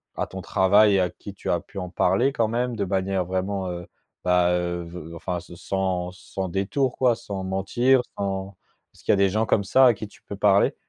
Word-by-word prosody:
à - - -2
ton - - -7
travail 100 +1 +4
à 90 -1 +2
qui 100 - -10
tu 100 - -6
as 85 - +2
pu 100 +3 -9
en 90 -1 -5
parler 95 +9 +2
quand 115 -4 +1
même, 120 +2 -1
de 100 -3 -1
manière 95 -1 0
vraiment, 95 +1 -2
heu, 90 0 -7 0.4
bah, 90 -1 +3
heu, 85 0 -1
ve 85 -1 -9
enfin 90 +1 -3
se 85 0 -12
sans 90 -1 -2
sans 95 0 -6
détour 115 +8 0
quoi? 125 -3 +4
Sans 95 -3 -6
mentir, 120 +7 +2
sans 95 -1 -3 0.4
est-ce - - -19
qu'il - - +2
y - - +6
a - - +5
des 100 0 +3
gens 110 +3 0
comme 100 - +2
ça 130 +6 +5
à 120 - +4
qui 110 - -7
tu - - -20
peux 100 - -8
parler? 100 0 +3
95 Hz, 225 wpm, -24 LUFS, 90-105 Hz, 0.4 s, y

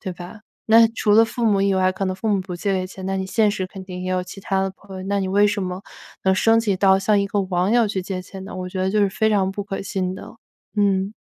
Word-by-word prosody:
对 185 -3 -5
吧？ 175 +5 -10 0.3
那 225 +1 +6
除 210 - +2
了 225 +2 +7
父 230 +1 -4
母 205 -3 +3
以 195 -1 +2
外， 185 0 +2
可 195 - -3
能 185 - -1
父 220 - -5
母 200 -2 +2
不 180 -1 -6
借 190 0 -1
钱， 190 0 -9
那 195 - -1
你 190 - -2
现 215 +2 +2
实 205 -2 -3
肯 190 -1 -10
定 180 -1 -7
也 185 - -3
有 185 0 0
其 190 +2 -10
他 195 0 -1
的 195 - -1
朋 195 0 -13
友， 185 - -6
那 200 +1 0
你 190 - -2
为 205 +2 +4
什 205 -1 -1
么 180 +1 -4 0.4
能 190 - +4
升 225 +4 +4
级 210 -4 0
到， 190 0 +4
向 200 +1 +2
一 200 - 0
个 200 +1 -1
网 185 0 0
友 240 -1 +4
去 195 -2 -2
借 185 0 -4
钱 190 +1 -10
呢？ 195 - -8
我 185 0 -5
觉 185 0 -4
得 190 - 0
就 210 +1 +1
是 200 - +3
非 220 +2 +1
常 195 -2 +1
不 205 +1 -4
可 195 -1 -5
信 185 -2 -2
的， - - -10 0.4
嗯。 200 -1 +1
195 Hz, 315 characters per minute, -22 LUFS, 185-205 Hz, 0.4 s, 了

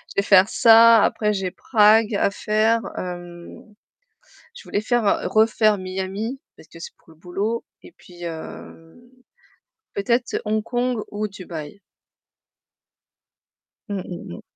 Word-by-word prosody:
vais 200 - +2
faire 195 +1 +5
ça, 230 -1 +6
après 210 -1 0
j'ai 190 -2 -3
Prague 215 -1 +3
à 200 - +1
faire. 220 +2 +1 0.2
Hem 175 +3 -9 0.8
Je 475 - -12
voulais 205 - -2
faire 240 +1 0 0.3
refaire 215 -1 +3
Miami, 190 +7 -5 0.2
parce - - -17
que - - -15
c'est 475 - -9
pour - - -27
le - - -18
boulot, 200 +7 -3 0.2
et - - -14
puis 175 -1 -15
hem 165 +2 -9 0.9
peut-être 235 +5 -1
Hong 215 0 0
Kong 245 +1 -2
ou 210 +1 -3
Dubaï. 180 -2 -9 2.1
Mmh, 200 -2 -3
mmh, 170 - -8
mmh. - - -12
210 Hz, 130 wpm, -22 LUFS, 185-225 Hz, 2.1 s, ça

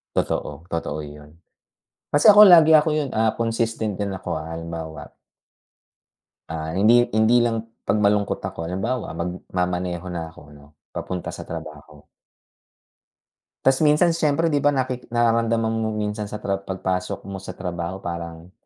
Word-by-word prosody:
Totoo. 75 +1 -2
Totoo 75 -2 -3
’yon. 75 +1 -12 0.8
Kasi 145 - +3
ako 210 0 +10
lagi 165 -5 +8
ako 155 +1 +5
’yon, 150 -3 -1
ah, 110 0 +3
consistent 115 -2 -1
din 100 +1 -3
ako, 95 -3 -4
ah, 80 +1 -6
halimbawa 80 -1 -7 1.4
ah, 80 0 -4
hindi 120 +4 +5
hindi 115 +3 +4
lang 115 -1 -1 0.2
'pag - - +1
malungkot 105 -1 +2
ako. 80 0 -5
Halimbawa, 105 +2 -3
magmamaneho 90 0 -3
na 80 -2 -5
ako 75 -2 -16
'no, 70 0 -16 0.3
papunta 90 -1 -5
sa - - -7
trabaho. 75 -1 -9 1.6
Ta's 135 0 +3
minsan 150 +4 +4
siyempre, 165 0 +1
di 145 - +2
ba, 145 +1 +2
naki 130 -2 -2
nararamdaman 115 -1 +1
mo 110 - -1
minsan 105 0 -3
sa 105 +1 -7
tra 100 -1 -1
pagpasok 95 -1 -3
mo 100 - -5
sa 95 -1 -9
trabaho 90 0 -5
parang 85 0 -6
100 Hz, 145 wpm, -23 LUFS, 85-120 Hz, 1.6 s, ako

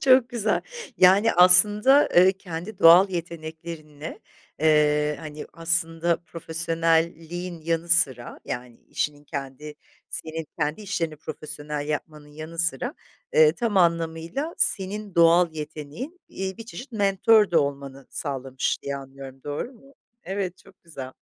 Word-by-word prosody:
Çok 255 -2 +4
güzel. 225 -4 -1 0.4
Yani, 195 +5 +5
aslında, 210 +10 +8
eee, 185 +2 +6
kendi 185 +1 -9
doğal 175 +4 +7
yeteneklerinle, 160 -2 -8 0.4
eee, 150 -1 +2
hani, 150 -1 -9
aslında, 165 0 -1
profesyonelliğin 165 +1 -1
yanı 165 +1 -3
sıra, 130 -8 +1
yani, 120 -1 -7
işinin 145 0 -4
kendi 145 +1 -8 0.4
senin 160 0 -5
kendi 150 +5 -2
işlerini 180 -6 -4
profesyonel 150 -1 -7
yapmanın 150 0 -6
yanı 155 +3 -10
sıra, 205 - -2 0.4
eee, 470 -1 +5
tam 230 -4 -2
anlamıyla 170 - -1
senin 200 +1 -1
doğal 170 0 +4
yeteneğin, 155 - -8
iii, 190 0 -6
bir 230 - -10
çeşit 255 +2 -10
mentor 205 0 +3
de 170 - +1
olmanı 140 -1 -4
sağlamış 135 -2 -3
diye 140 0 -4
anlıyorum, 135 -1 -11
doğru 145 - -5
mu? 275 +3 -21 0.3
Evet, 190 -1 -4
çok - - -22
güzel. 135 -6 -9
165 Hz, 125 wpm, -24 LUFS, 150-190 Hz, 0.4 s, aslında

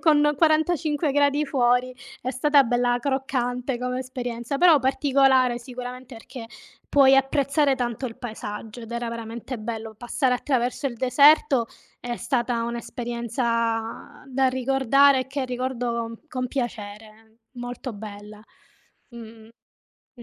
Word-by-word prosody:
con 295 -2 +4
45 310 -2 +2
gradi 290 +1 +2
fuori. 250 -2 +1 0.3
È 255 - -2
stata 285 +2 +4
bella 245 0 +1
croccante 255 -1 -2
come 250 0 -2
esperienza, 245 0 -4
però 335 -2 +6
particolare 265 -2 +3
sicuramente 250 0 -8
perché 225 +1 -10 0.4
puoi 270 -1 +6
apprezzare 275 +1 +2
tanto 245 0 -3
il 225 - -8
paesaggio, 220 0 -7
ed 230 0 -10
era 235 0 -3
veramente 230 +2 -6
bello. 220 0 -6
Passare 250 +3 -1
attraverso 250 +1 -1
il 250 - -3
deserto 265 0 +4 0.3
è 240 -1 -4
stata 240 -3 -1
un' 235 0 -3
esperienza 235 +1 -3
da 265 0 +1
ricordare 270 +1 +3
e 255 - -5
che 270 0 -3
ricordo 245 -2 -3
con 255 -2 -3
piacere, 220 -2 -6
molto 245 +1 -6
bella. 210 0 -10 0.7
Mh, 235 0 -10 0.9
mh, 240 - -13
250 Hz, 125 wpm, -24 LUFS, 235-270 Hz, 0.9 s, però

